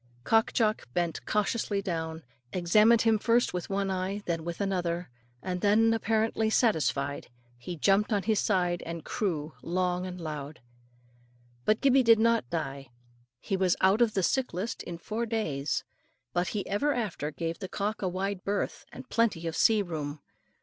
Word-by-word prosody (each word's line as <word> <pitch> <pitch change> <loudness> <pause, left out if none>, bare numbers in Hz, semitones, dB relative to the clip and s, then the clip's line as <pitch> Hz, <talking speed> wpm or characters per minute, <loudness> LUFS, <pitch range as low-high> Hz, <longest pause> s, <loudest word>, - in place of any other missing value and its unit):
Cock 225 - +3
Jock 215 - 0
bent 175 -2 -1
cautiously 210 -1 0
down, 160 -4 -3 0.3
examined 210 +6 +4
him 225 -2 +3
first 235 +3 +2
with 180 -1 -4
one 195 0 0
eye 190 +2 -2
then 165 -2 -2
with 170 0 -5
another, 180 -5 -1 0.3
and 180 -1 -3
then, 225 +2 +4
apparently 220 0 +1
satisfied, 155 - +1 0.3
he 125 +9 -7
jumped 200 +7 +3
on 205 -2 +1
his 220 -2 +2
side 180 -3 +1
and 165 -1 -6
crew 160 -7 -2
loud 180 +1 -1
and 180 -1 -6
long. 150 -2 -5 1.1
But 215 +1 +2
Gibbey 270 -1 +5
did 230 -2 +6
not 230 - +2
die. 135 -4 -4 0.5
He 195 - -2
was 185 -2 +2
out 195 +5 +4
of 230 -3 +3
the 190 - +1
sick 260 +1 0
list 210 +6 -3
in 175 - -6
four 220 +7 -3
days; 155 -11 -1 0.5
but 175 +1 +1
he 205 -2 -3
ever 285 +9 +1
after 205 -11 -2
gave 165 +2 -4
the 190 - -6
cock 210 +2 -2
a 190 - 0
wide 190 +1 -3
berth, 200 +1 -2
and - - -10
plenty 220 -8 +1
of 165 -1 -3
sea 220 -2 +4
room. 155 -4 -5
190 Hz, 170 wpm, -29 LUFS, 170-220 Hz, 1.1 s, did